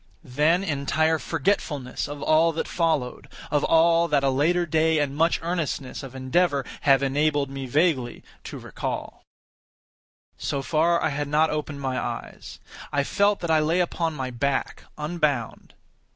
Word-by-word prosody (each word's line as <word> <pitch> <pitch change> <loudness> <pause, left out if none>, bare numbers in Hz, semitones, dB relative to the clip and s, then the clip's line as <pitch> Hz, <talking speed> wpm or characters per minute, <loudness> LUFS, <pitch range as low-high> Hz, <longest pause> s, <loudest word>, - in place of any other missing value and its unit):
Then 155 +6 +2
entire 155 0 +1
forgetfulness 145 -4 -2
of 145 0 -7
all 160 +1 +4
that 160 - -3
followed; 160 -8 -1 0.2
of 145 -1 +2
all 165 +1 +4
that 145 -3 +1
a 135 - +3
later 170 +6 +2
day 160 0 +2
and 145 -2 0
much 165 +3 +2
earnestness 165 -6 -3
of 135 -2 -10
endeavor 140 +2 +1 0.2
have 135 0 +5
enabled 145 0 +1
me 135 -1 -5
vaguely 140 -3 0 0.2
to - - -7
recall. - - -5 1.2
So 140 -1 -2
far, 170 +3 +2
I - - +2
had 145 0 -3
not 155 +2 +2
opened 150 -2 -4
my 130 -1 -1
eyes. - - -6 0.3
I 140 -1 +1
felt 200 +7 +1
that 170 -2 -1
I 160 - +5
lay 160 +4 +1
upon 165 -2 -1
my 130 -2 -4
back, 135 +3 -2
unbound. 150 -6 -2
150 Hz, 150 wpm, -25 LUFS, 140-165 Hz, 1.2 s, have